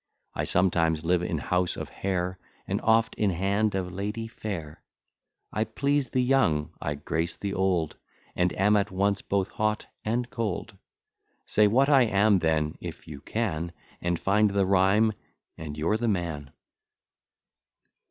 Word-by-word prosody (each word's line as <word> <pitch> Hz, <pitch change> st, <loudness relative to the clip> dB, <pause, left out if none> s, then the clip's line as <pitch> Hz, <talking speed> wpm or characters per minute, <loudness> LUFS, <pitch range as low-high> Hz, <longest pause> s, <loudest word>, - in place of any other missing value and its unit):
I -, -, -2 dB
sometimes 85 Hz, -3 st, +2 dB
live 90 Hz, +1 st, +2 dB
in 85 Hz, -2 st, -2 dB
house 90 Hz, +4 st, 0 dB
of -, -, -5 dB
hair, 95 Hz, -1 st, -2 dB, 0.3 s
And -, -, -1 dB
oft 115 Hz, 0 st, +3 dB
in 105 Hz, -, +3 dB
hand 100 Hz, +4 st, +1 dB
of 90 Hz, -1 st, -3 dB
lady 105 Hz, +4 st, -3 dB
fair. 85 Hz, -9 st, -6 dB, 0.7 s
I 110 Hz, -, +1 dB
please 140 Hz, +5 st, 0 dB
the 130 Hz, -, +1 dB
young, 105 Hz, -, +2 dB
I 75 Hz, -, -2 dB
grace 80 Hz, +3 st, -2 dB
the 100 Hz, -1 st, -3 dB
old, 90 Hz, -5 st, 0 dB, 0.4 s
And 90 Hz, 0 st, +2 dB
am 105 Hz, +2 st, +3 dB
at 100 Hz, -1 st, +2 dB
once 100 Hz, +1 st, 0 dB
both 100 Hz, -1 st, -1 dB
hot 110 Hz, 0 st, -1 dB, 0.2 s
and 120 Hz, +3 st, -1 dB
cold. 110 Hz, -6 st, -3 dB, 0.7 s
Say 105 Hz, 0 st, +4 dB
what 130 Hz, +6 st, +4 dB
I 140 Hz, -3 st, +6 dB
am 100 Hz, -1 st, +4 dB
then, 80 Hz, -2 st, 0 dB
if -, -, -8 dB
you 70 Hz, -2 st, -8 dB
can, 85 Hz, -7 st, -2 dB, 0.3 s
And 85 Hz, 0 st, 0 dB
find 105 Hz, +4 st, +3 dB
the 100 Hz, -1 st, +1 dB
rhyme, 100 Hz, +3 st, +4 dB, 0.4 s
and 75 Hz, -2 st, -7 dB
you're 85 Hz, +8 st, +1 dB
the 120 Hz, +1 st, -1 dB
man. 85 Hz, -8 st, -2 dB
95 Hz, 150 wpm, -27 LUFS, 85-110 Hz, 0.7 s, I